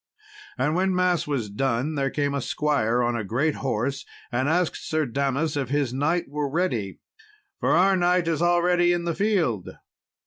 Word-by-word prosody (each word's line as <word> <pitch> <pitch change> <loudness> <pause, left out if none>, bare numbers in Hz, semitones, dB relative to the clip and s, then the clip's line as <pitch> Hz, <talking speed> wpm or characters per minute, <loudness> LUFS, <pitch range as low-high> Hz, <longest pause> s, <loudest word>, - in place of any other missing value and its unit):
And 150 - +1
when 185 +2 +1
mass 180 -3 +1
was 135 -7 -1
done, 125 +6 -1
there 135 -2 0
came 145 0 -1
a 140 - -1
squire 125 -5 0
on 120 0 0
a 115 - -2
great 130 +10 0
horse, 135 +1 -1 0.3
and 130 +3 0
asked 175 +1 +1
Sir 155 -1 0
Damas 140 +4 -1
if 135 -4 -2
his 140 -3 0
knight 160 +6 0
were 145 0 -3
ready, 125 - -1 0.6
"for - - +1
our 190 +3 +4
knight 180 -1 +2
is 165 -1 0
already 175 0 +3
in 175 -1 -1
the 170 - 0
field." 170 - 0
145 Hz, 175 wpm, -25 LUFS, 130-175 Hz, 0.6 s, our